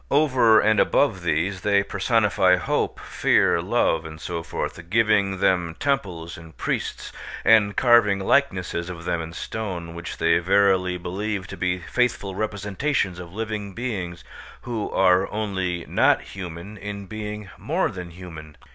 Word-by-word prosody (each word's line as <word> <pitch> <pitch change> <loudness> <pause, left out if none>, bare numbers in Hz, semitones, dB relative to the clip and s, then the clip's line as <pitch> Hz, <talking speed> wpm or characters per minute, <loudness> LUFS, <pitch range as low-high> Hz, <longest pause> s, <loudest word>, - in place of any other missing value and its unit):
Over 130 -6 +5
and 110 -1 +3
above 110 -10 +2
these 85 +3 -1
they 100 0 +3
personify 100 -2 +2
hope, 90 -1 -1
fear, - - +2
love, 80 -1 +1
and 80 -1 -9
so 85 0 -4
forth, 85 +1 -5
giving 105 -2 +2
them 90 -3 +1
temples 90 - -2
and 80 -1 -14
priests, - - -3 0.3
and 105 -2 +5
carving 120 -5 +5
likenesses 95 -6 0
of 85 -2 -8
them 85 -2 -1
in 80 0 -7
stone, 85 -2 -5
which 85 +1 -7
they 85 +1 +3
verily 95 0 +2
believe 95 +3 -3
to - - -6
be 90 0 -1
faithful 100 +1 -1
representations 100 0 -2
of 85 -2 -9
living 105 -1 -4
beings 95 -8 -4 0.4
who 115 -4 -3
are 95 0 +3
only 95 -5 -2
not - - +3
human 90 +2 -8
in 100 0 -6
being 105 -1 -6
more - - 0
than 90 -1 -7
human. 80 -4 -11
95 Hz, 145 wpm, -24 LUFS, 85-105 Hz, 0.4 s, Over